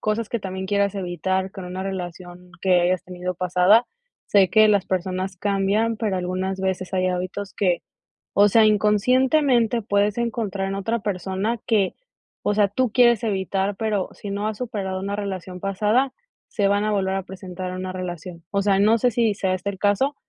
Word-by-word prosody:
cosas 215 Hz, +1 st, -1 dB
que 235 Hz, -, -2 dB
también 190 Hz, -1 st, -5 dB
quieras 200 Hz, 0 st, +1 dB
evitar 190 Hz, +1 st, -2 dB
con 190 Hz, -, -8 dB
una 185 Hz, +1 st, -5 dB
relación 180 Hz, -1 st, -7 dB
que 185 Hz, -2 st, +4 dB
hayas 180 Hz, +1 st, +1 dB
tenido 180 Hz, 0 st, -5 dB
pasada. 180 Hz, +6 st, +4 dB, 0.4 s
Sé 195 Hz, -2 st, +4 dB
que 215 Hz, 0 st, +6 dB
las 205 Hz, -3 st, +3 dB
personas 185 Hz, 0 st, -2 dB
cambian, 205 Hz, +4 st, +1 dB
pero 210 Hz, -4 st, -1 dB
algunas 185 Hz, +1 st, -2 dB
veces 190 Hz, -1 st, -2 dB
hay 185 Hz, 0 st, +1 dB
hábitos 185 Hz, +2 st, -4 dB
que, 180 Hz, -4 st, +1 dB, 0.5 s
o 205 Hz, -, +6 dB
sea, 220 Hz, +2 st, +5 dB
inconscientemente 240 Hz, +3 st, +3 dB
puedes 205 Hz, +1 st, +1 dB
encontrar 215 Hz, -5 st, -2 dB
en 195 Hz, -, -3 dB
otra 225 Hz, +4 st, -1 dB
persona 200 Hz, +3 st, -2 dB
que, 205 Hz, -4 st, +2 dB, 0.5 s
o 205 Hz, -, +1 dB
sea, 205 Hz, -1 st, +3 dB
tú 235 Hz, +3 st, 0 dB
quieres 240 Hz, -2 st, +4 dB
evitar, 195 Hz, -1 st, -1 dB
pero 210 Hz, -3 st, -1 dB
si 205 Hz, -, -8 dB
no 200 Hz, +1 st, -2 dB
has 215 Hz, -1 st, -5 dB
superado 200 Hz, -6 st, -3 dB
una 200 Hz, +1 st, -3 dB
relación 190 Hz, -3 st, -5 dB
pasada, 210 Hz, +7 st, +1 dB, 0.4 s
se 200 Hz, -3 st, +1 dB
van 205 Hz, +1 st, +2 dB
a 215 Hz, -, 0 dB
volver 190 Hz, -2 st, 0 dB
a 195 Hz, -, -3 dB
presentar 185 Hz, -1 st, -7 dB
en 185 Hz, -, -5 dB
una 185 Hz, 0 st, -4 dB
relación. 175 Hz, -2 st, -7 dB
O 200 Hz, -1 st, +1 dB
sea, 195 Hz, -1 st, +3 dB
no 215 Hz, +3 st, +4 dB
sé 245 Hz, +3 st, +2 dB
si 225 Hz, -2 st, +1 dB
sea 190 Hz, -2 st, 0 dB
este 185 Hz, +2 st, -4 dB
el 195 Hz, -, -9 dB
caso, 210 Hz, +8 st, +2 dB
195 Hz, 185 wpm, -23 LUFS, 185-215 Hz, 0.5 s, que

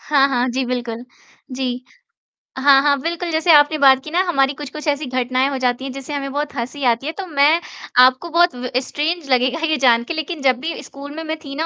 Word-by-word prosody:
हाँ, 280 Hz, -2 st, +3 dB
हाँ। 250 Hz, -1 st, 0 dB
जी, 260 Hz, +2 st, -1 dB
बिल्कुल, 240 Hz, -1 st, -4 dB, 0.5 s
जी। 250 Hz, -1 st, -4 dB, 0.7 s
हाँ, 270 Hz, 0 st, +5 dB
हाँ, 285 Hz, -1 st, +2 dB
बिल्कुल, 340 Hz, +2 st, -3 dB
जैसे 320 Hz, +2 st, +2 dB
आपने 295 Hz, +1 st, +5 dB
बात 265 Hz, -2 st, +5 dB
की 305 Hz, -, -9 dB
ना 345 Hz, -, +1 dB
हमारी 275 Hz, -4 st, +1 dB
कुछ-कुछ 300 Hz, +2 st, -7 dB
ऐसी 290 Hz, +1 st, 0 dB
घटनाएँ 255 Hz, +1 st, 0 dB
हो 275 Hz, -, -3 dB
जाती 250 Hz, 0 st, -1 dB
हैं 270 Hz, -, -5 dB
जिससे 275 Hz, +2 st, -8 dB
हमें 275 Hz, -1 st, -4 dB
बहुत 290 Hz, 0 st, -3 dB
हँसी 260 Hz, +3 st, -5 dB
आती 235 Hz, +4 st, -3 dB
है। -, -, -1 dB
तो 390 Hz, -, -5 dB
मैं 300 Hz, +2 st, +3 dB, 0.4 s
आपको 260 Hz, +7 st, +2 dB
बहुत 345 Hz, -1 st, +2 dB
व 250 Hz, 0 st, -5 dB
स्ट्रेंज 300 Hz, +2 st, -3 dB
लगेगा 255 Hz, +4 st, +2 dB
ये 310 Hz, -1 st, 0 dB
जान 235 Hz, -3 st, +3 dB
के 330 Hz, -, -5 dB
लेकिन 315 Hz, 0 st, -5 dB
जब 255 Hz, -2 st, +2 dB
भी 320 Hz, +4 st, -5 dB
स्कूल 280 Hz, +1 st, -10 dB
में 325 Hz, -, -6 dB
मैं 315 Hz, 0 st, -4 dB
थी 275 Hz, -1 st, -8 dB
ना 320 Hz, +3 st, -2 dB
275 Hz, 225 wpm, -19 LUFS, 255-310 Hz, 0.7 s, हाँ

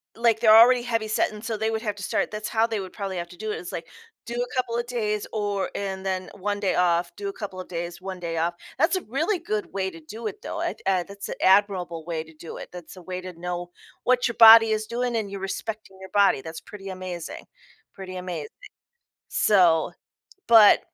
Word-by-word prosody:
like 230 Hz, -1 st, +2 dB
they're 220 Hz, -1 st, +7 dB
already 240 Hz, +2 st, +7 dB
heavy 230 Hz, -2 st, -1 dB
set 215 Hz, -, +1 dB
and 210 Hz, 0 st, -10 dB
so 225 Hz, -2 st, -2 dB
they 220 Hz, +1 st, 0 dB
would 220 Hz, 0 st, -2 dB
have 210 Hz, -3 st, -2 dB
to 200 Hz, -, -9 dB
start -, -, 0 dB
that's 210 Hz, 0 st, -5 dB
how 225 Hz, 0 st, +2 dB
they 220 Hz, -3 st, -2 dB
would 190 Hz, -1 st, -7 dB
probably 195 Hz, -2 st, -4 dB
have 170 Hz, 0 st, -4 dB
to 175 Hz, -, -13 dB
do 215 Hz, 0 st, -4 dB
it. -, -, -2 dB
It's 175 Hz, -, -8 dB
like, 165 Hz, -, -6 dB, 0.4 s
do 235 Hz, -, -5 dB
a 245 Hz, +1 st, -3 dB
couple 245 Hz, -2 st, -1 dB
of 240 Hz, -, -1 dB
days 210 Hz, -4 st, -1 dB
or 205 Hz, -2 st, -1 dB
and 195 Hz, -1 st, -4 dB
then 185 Hz, -1 st, -2 dB
1 205 Hz, +1 st, -2 dB
day 195 Hz, -2 st, 0 dB
off, 175 Hz, -1 st, +2 dB
do 200 Hz, -1 st, -3 dB
a -, -, -6 dB
couple 195 Hz, -3 st, -7 dB
of 185 Hz, -, -7 dB
days, 175 Hz, 0 st, -5 dB
1 190 Hz, -1 st, -6 dB
day 165 Hz, -1 st, -4 dB
off. 170 Hz, +2 st, +1 dB, 0.2 s
That's 325 Hz, +7 st, +3 dB
a 370 Hz, -, -1 dB
really 320 Hz, -, -1 dB
good 215 Hz, -13 st, -3 dB
way 190 Hz, -1 st, -1 dB
to 165 Hz, -3 st, -12 dB
do 215 Hz, +8 st, -7 dB
it 205 Hz, -, -7 dB
though. -, -, -4 dB
I -, -, -1 dB
thi -, -, -22 dB, 0.2 s
that's 200 Hz, 0 st, -8 dB
an -, -, -4 dB
admirable 185 Hz, -4 st, +3 dB
way 165 Hz, -2 st, -3 dB
to 160 Hz, 0 st, -17 dB
do 160 Hz, +2 st, -9 dB
it, -, -, -8 dB
that's 180 Hz, 0 st, -10 dB
a 185 Hz, -, -11 dB
way 185 Hz, +1 st, -5 dB
to 185 Hz, -1 st, -8 dB
know 175 Hz, 0 st, -4 dB, 0.3 s
what 250 Hz, -1 st, +3 dB
your 235 Hz, -, -4 dB
body 225 Hz, -1 st, +10 dB
is 215 Hz, 0 st, 0 dB
doing 240 Hz, +1 st, -2 dB
and 210 Hz, -3 st, -2 dB
you're 200 Hz, -, -5 dB
respecting 195 Hz, 0 st, -5 dB
your 190 Hz, -, -10 dB
body, 200 Hz, -9 st, +4 dB
that's 160 Hz, +2 st, -8 dB
pretty 195 Hz, -2 st, -10 dB
amazing. 185 Hz, -3 st, -6 dB, 0.5 s
Pretty 190 Hz, -2 st, -8 dB
amazing. 175 Hz, -5 st, -5 dB, 0.8 s
So, 175 Hz, -6 st, +3 dB, 0.6 s
but 220 Hz, -3 st, +8 dB
200 Hz, 235 wpm, -25 LUFS, 180-220 Hz, 0.8 s, body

